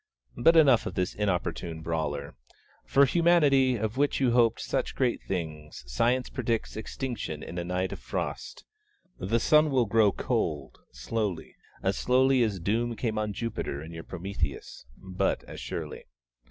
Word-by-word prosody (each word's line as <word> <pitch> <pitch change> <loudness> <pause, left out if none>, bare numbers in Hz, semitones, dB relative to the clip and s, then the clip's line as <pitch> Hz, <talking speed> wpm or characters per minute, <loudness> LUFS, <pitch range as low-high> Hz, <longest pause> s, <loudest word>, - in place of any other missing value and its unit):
But 165 +6 +5
enough 135 -7 +5
of - - -6
this 90 -1 -1
inopportune 90 -4 -2
brawler. 75 -4 -3 0.5
For 140 +1 +5
Humanity, 145 -5 +4
of 110 +1 -3
which 145 +1 +1
you 130 -3 +3
hoped 115 -2 +3
such - - -2
great 125 -3 0
things, 80 -6 -5
Science 120 - +1
predicts 115 -3 -2
extinction 110 - -5
in 85 - -6
a - - -2
night 90 +1 -2
of - - -6
Frost. - - -5 0.5
The 110 +6 0
sun 155 +5 +4
will 130 -4 +2
grow 105 -1 +4
cold, 75 -5 -2
slowly 90 - -3 0.3
as 95 +1 0
slowly 130 +1 +3
as 105 -5 0
doom 115 +6 0
came 110 -2 -2
on 105 -1 -1
Jupiter 100 -10 -4
in 80 - -9
your 80 0 -7
'Prometheus,' 85 -9 -5
but 95 -1 -1
as - - -9
surely. - - -6
110 Hz, 155 wpm, -28 LUFS, 85-125 Hz, 0.5 s, But